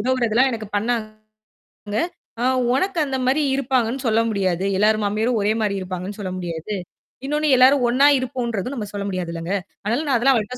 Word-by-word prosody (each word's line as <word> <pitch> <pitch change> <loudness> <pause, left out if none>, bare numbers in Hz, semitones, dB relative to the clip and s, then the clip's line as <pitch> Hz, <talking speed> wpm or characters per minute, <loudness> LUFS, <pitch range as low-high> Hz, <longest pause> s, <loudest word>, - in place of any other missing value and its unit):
உதவுறதெல்லாம் 255 0 +2
எனக்கு 220 -2 -5
பண்ணாங்க. 215 -1 -2 1.2
அ - - 0 0.3
உனக்கு 370 +8 0
அந்த 270 -2 -2
மாரி 275 +4 +2
இருப்பாங்கன்னு 260 -1 0
சொல்ல 225 0 +3
முடியாது. 190 -3 0
எல்லார் 215 +1 +3
மாமியாரும் 215 +3 0
ஒரே 210 +2 +2
மாரி 205 -2 0
இருப்பாங்கன்னு 185 +2 -5
சொல்ல 185 -3 -4
முடியாது. 175 +3 -4 0.5
இன்னொன்னு 300 +2 0
எல்லாரும் 260 0 +5
ஒண்ணா 265 +4 +5
இருப்போங்கறதும், 245 -2 -3
நம்ம 215 -5 -4
சொல்ல 200 -1 -3
முடியாதுல்லங்க. 175 -1 -4 0.3
ஆனாலும் 235 +9 0
நான் 260 - +4
அதெல்லாம் 270 +3 +4
அவள்ட்ட 225 +3 -4
225 Hz, 160 wpm, -22 LUFS, 200-255 Hz, 1.2 s, எல்லாரும்